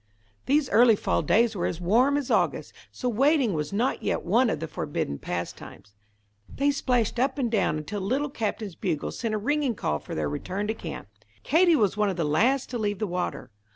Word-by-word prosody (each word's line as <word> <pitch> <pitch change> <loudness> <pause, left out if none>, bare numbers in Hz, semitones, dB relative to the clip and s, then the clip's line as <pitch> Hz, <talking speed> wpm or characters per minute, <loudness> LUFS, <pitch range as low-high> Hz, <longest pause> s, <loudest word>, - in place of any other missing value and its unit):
These 285 +1 +3
early 235 -1 +6
fall - - 0
days 230 0 +2
were 175 - -1
as 165 - -4
warm 240 +11 +3
as 275 -3 -3
August, - - 0 0.2
so 250 - -4
wading 265 0 +2
was 150 -2 -3
not 230 +6 0
yet - - -1
one 230 +7 +3
of - - -2
the 165 - -4
forbidden 70 - -3
pastimes. 90 +3 -6 0.6
They 285 +1 +1
splashed 250 -5 0
up 265 +2 +1
and 245 -5 -1
down 195 -8 +1
until 200 +7 -5
the 190 - -4
Little 275 +5 0
Captain's 215 -4 -3
bugle 165 -2 -3
sent 225 -3 -3
a - - 0
ringing 275 +2 0
call 75 - -1
for - - -8
their 75 -1 -1
return 185 - -3
to - - +1
camp. 165 - -7 0.4
Katie 335 +3 +4
was 210 - +1
one 210 -1 +2
of 185 - -3
the 165 - 0
last 240 - +2
to 240 - -3
leave 205 -2 -1
the 215 - -1
water. 180 - -4
220 Hz, 210 wpm, -26 LUFS, 180-260 Hz, 0.6 s, early